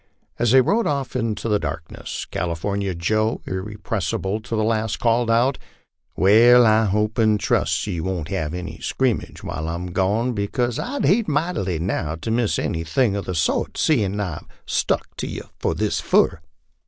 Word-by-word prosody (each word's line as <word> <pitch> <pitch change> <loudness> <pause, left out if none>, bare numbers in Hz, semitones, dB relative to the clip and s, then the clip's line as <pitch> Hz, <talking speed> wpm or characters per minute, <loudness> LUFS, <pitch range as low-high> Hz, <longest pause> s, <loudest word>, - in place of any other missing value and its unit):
As 120 0 +2
they 130 +3 +7
rode 215 - +1
off 140 -3 -2
in 115 -3 0
the 105 -2 0
darkness 80 0 -5
California 95 +3 -2
Joe, 110 +6 0
ir 95 0 -3
repressible 105 -1 -3
to 115 - -3
the 110 - +1
last, 110 -1 0
called 115 0 +2
out, 120 +4 +2 0.3
" - - -47
Wai, 110 +6 +6
I 110 -2 +5
hope 105 +3 0
an' 110 -1 +4
trust - - 0
yer 90 -5 -3
won't 85 -2 -3
have 80 -4 -2
any 90 0 -6
scrimmage 130 -4 -1
while 80 0 -4
I'm 90 +2 -4
gone, 105 +7 +1
because 120 +3 -1
I'd 280 +3 -2
hate 215 +3 +3
mightily 150 - -1
now 80 -2 -2
to 80 +7 -4
miss 115 -1 +1
anything 85 +7 0
of 100 - -3
the 90 - -3
sort, 80 - 0
seein' 105 -9 +1
I've 90 -7 -4 0.2
stuck - - 0
to - - -3
yer - - -6 0.3
this - - 0
fur." 85 - +2
105 Hz, 170 wpm, -22 LUFS, 90-120 Hz, 0.3 s, they